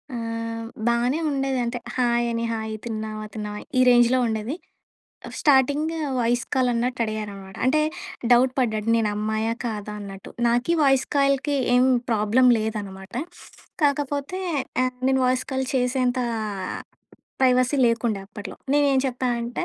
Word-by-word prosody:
ఆహ్, 230 Hz, 0 st, -4 dB, 0.2 s
బానే 240 Hz, +6 st, +2 dB
ఉండేది. 270 Hz, -2 st, -1 dB
అంటే, 240 Hz, +1 st, -3 dB, 0.2 s
హాయ్ 240 Hz, -1 st, +2 dB
అని, 230 Hz, 0 st, -2 dB
హాయ్, 220 Hz, -1 st, -4 dB
తిన్నావా? 215 Hz, -1 st, -4 dB
తిన్నావా? 210 Hz, -1 st, -5 dB, 0.2 s
ఈ -, -, +6 dB
రేంజ్‌లో 240 Hz, +1 st, +5 dB
ఉండేది. 220 Hz, +6 st, -2 dB, 0.9 s
స్టార్టింగ్ 290 Hz, +2 st, +3 dB, 0.3 s
వాయిస్ 235 Hz, 0 st, +1 dB
కాల్ 255 Hz, -1 st, +2 dB
అన్నట్టు 245 Hz, +1 st, -1 dB
అడిగారన్నమాట. 205 Hz, -3 st, -6 dB
అంటే 305 Hz, +4 st, +3 dB, 0.5 s
డౌట్ 250 Hz, +1 st, +5 dB
పడ్డాడు 220 Hz, -3 st, 0 dB
నేను 220 Hz, -2 st, +1 dB
అమ్మాయా? 220 Hz, +1 st, -1 dB
కాదా? 210 Hz, -2 st, -4 dB
అన్నట్టు. 195 Hz, -1 st, -9 dB, 0.2 s
నాకి 245 Hz, +8 st, +2 dB
వాయిస్ 270 Hz, -2 st, +3 dB
కాల్‌కి 275 Hz, +1 st, +2 dB, 0.2 s
ఏం 250 Hz, +1 st, +5 dB, 0.3 s
ప్రాబ్లమ్ 225 Hz, +4 st, +4 dB
లేదన్నమాట. 200 Hz, -2 st, -5 dB, 0.7 s
కాకపోతే 285 Hz, +5 st, -1 dB, 0.4 s
ఆహ్, 255 Hz, 0 st, -2 dB
నేను 265 Hz, 0 st, +2 dB
వాయిస్ 255 Hz, 0 st, +1 dB
కాల్ 265 Hz, 0 st, -1 dB
చేసేంత 250 Hz, 0 st, +1 dB, 1.2 s
ప్రైవసీ 255 Hz, +1 st, +3 dB
లేకుండే 230 Hz, -3 st, 0 dB
అప్పట్లో. 205 Hz, -2 st, -8 dB, 0.2 s
నేను 290 Hz, -1 st, +4 dB
ఏం 260 Hz, -, +3 dB
చెప్పా 255 Hz, +1 st, -3 dB
అంటే 235 Hz, +1 st, -3 dB
240 Hz, 130 wpm, -24 LUFS, 220-260 Hz, 1.2 s, ఈ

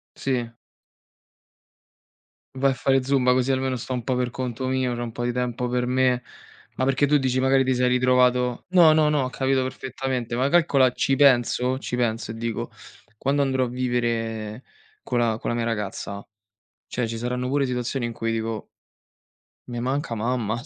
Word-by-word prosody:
Sì. 125 Hz, -4 st, -2 dB, 2.1 s
Vai 135 Hz, +1 st, +2 dB
a -, -, -1 dB
fare 135 Hz, +1 st, +2 dB
zumba 130 Hz, -1 st, +3 dB
così 130 Hz, +1 st, +1 dB
almeno 130 Hz, 0 st, 0 dB
sto 125 Hz, +1 st, -5 dB
un 125 Hz, -2 st, -3 dB
po' 130 Hz, +2 st, -1 dB
per 125 Hz, -1 st, 0 dB
conto 130 Hz, 0 st, -4 dB
mio, 130 Hz, -1 st, 0 dB
c'ho 120 Hz, -, -4 dB
un 120 Hz, -, -5 dB
po' 120 Hz, -, -5 dB
di 120 Hz, -, 0 dB
tempo 125 Hz, 0 st, -2 dB
per 125 Hz, 0 st, 0 dB
me, 125 Hz, 0 st, +1 dB, 0.5 s
ma 130 Hz, -, +1 dB
perché 135 Hz, +2 st, +2 dB
tu 150 Hz, +1 st, +4 dB
dici 130 Hz, -2 st, 0 dB
magari 135 Hz, +1 st, +3 dB
ti 130 Hz, 0 st, +1 dB
sei 125 Hz, 0 st, +2 dB
ritrovato 125 Hz, -1 st, +2 dB
no, 175 Hz, -4 st, +6 dB
no, 155 Hz, -1 st, +4 dB
no, 150 Hz, -2 st, +2 dB
ho 130 Hz, -, -2 dB
capito 135 Hz, 0 st, 0 dB
perfettamente, 130 Hz, -2 st, -4 dB
ma 130 Hz, +3 st, +1 dB
calcola 140 Hz, -6 st, +4 dB
ci 135 Hz, +2 st, +1 dB
penso 130 Hz, -2 st, +3 dB
ci 125 Hz, -, -4 dB
penso 115 Hz, -2 st, -1 dB
e -, -, -6 dB
dico: 115 Hz, +1 st, -4 dB, 0.5 s
"Quando 140 Hz, +4 st, +1 dB
andrò 130 Hz, -1 st, +1 dB
a -, -, -3 dB
vivere 115 Hz, -2 st, -2 dB, 0.4 s
co' 125 Hz, -, -2 dB
la 115 Hz, -2 st, +1 dB
con -, -, -3 dB
la -, -, -1 dB
mia 120 Hz, -1 st, -1 dB
ragazza, 100 Hz, -2 st, -4 dB, 0.6 s
cioè 125 Hz, -1 st, -2 dB
ci 115 Hz, 0 st, -4 dB
saranno 125 Hz, +2 st, -2 dB
pure 140 Hz, +1 st, +1 dB
situazioni 125 Hz, 0 st, -2 dB
in 120 Hz, -, -4 dB
cui 115 Hz, 0 st, -3 dB
dico" 115 Hz, -1 st, -3 dB, 1.0 s
"me 120 Hz, -1 st, -4 dB
manca 130 Hz, 0 st, -2 dB
mamma, 115 Hz, 0 st, -1 dB
125 Hz, 185 wpm, -24 LUFS, 120-130 Hz, 2.1 s, no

